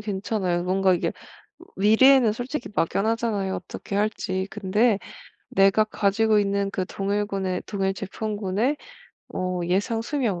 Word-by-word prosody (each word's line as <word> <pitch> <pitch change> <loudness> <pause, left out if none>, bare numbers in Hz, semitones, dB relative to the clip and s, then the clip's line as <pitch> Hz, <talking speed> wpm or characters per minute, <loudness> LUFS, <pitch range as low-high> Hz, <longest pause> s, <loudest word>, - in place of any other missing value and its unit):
괜찮아요. 190 -3 -1
뭔가 190 +1 +2
이게 175 - -1 0.6
미래에는 225 +4 +5
솔직히 245 +1 -5
막연하잖아요, 205 +1 0
어떻게 195 +2 -6
할지. 190 -3 -1
근데 210 +2 +1 0.5
내가 195 +2 +4
가지고 215 +1 +2
있는 200 0 0
그 185 -1 -2
동일군의 195 -2 -2
동일 195 -2 -1
제품군의 210 +5 -2 0.6
어 185 -1 -2
예상 205 +5 0
수명 235 -8 -1
200 Hz, 295 characters per minute, -24 LUFS, 190-220 Hz, 0.6 s, 미래에는